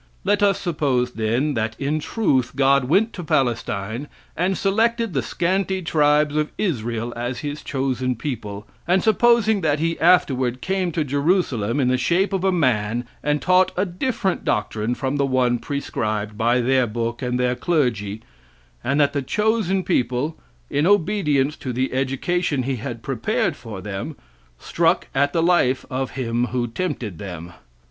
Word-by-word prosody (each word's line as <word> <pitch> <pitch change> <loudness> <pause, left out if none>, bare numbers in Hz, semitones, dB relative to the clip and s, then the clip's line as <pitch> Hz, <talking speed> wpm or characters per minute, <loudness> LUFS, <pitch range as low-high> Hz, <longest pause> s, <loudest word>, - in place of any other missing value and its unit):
Let 205 +2 +2
us 200 -2 +3
suppose, 140 -8 0
then, 120 +6 0
that 110 -2 -2
in 145 +3 0
truth 135 - 0
God 135 -1 +3
went 195 - +2
to 180 - -6
Palestine 120 -3 -1 0.3
and 185 +3 0
selected 225 +1 +1
the 135 - +1
scanty 190 - -1
tribes 150 -2 +2
of 155 0 +1
Israel 120 - -2
as 120 +1 -4
his 145 +1 -4
chosen 130 -2 -1
people, 105 -5 -5 0.2
and 180 +2 +3
supposing 220 -1 +4
that 150 -3 +2
he 165 +2 -1
afterward 130 -8 +3
came 185 +2 -1
to 155 - 0
Jerusalem 140 - 0
in 130 - +2
the 130 0 +2
shape 175 +10 +1
of 190 -1 -1
a 190 - +3
man 120 - +1 0.2
and 150 0 0
taught 185 0 +4
a 190 - +2
different 190 +1 -2
doctrine 105 +2 -1
from 135 +3 -2
the 140 - +2
one 125 -2 +2
prescribed 110 -7 -3
by 120 +3 +2
their 130 0 +2
book 115 +2 -3
and 125 -1 -1
their 125 0 +2
clergy, 115 - -1 0.6
and 140 +4 +1
that 145 -1 +3
the 140 - 0
chosen 210 - 0
people, 130 -1 0 0.3
in 145 - +1
obedience 160 -8 +2
to 130 - -5
the 130 +2 -1
education 135 +3 0
he 130 0 -2
had 120 -1 -6
prepared 125 -4 -1
for 110 -5 -8
them, 105 +9 -5 0.4
struck 170 - +1
at 140 +1 +2
the 165 +1 +1
life 165 -7 +2
of 130 0 -2
him 120 -1 0
who 125 0 -1
tempted 120 - -4
them. 90 -3 -7
135 Hz, 160 wpm, -22 LUFS, 120-175 Hz, 0.6 s, supposing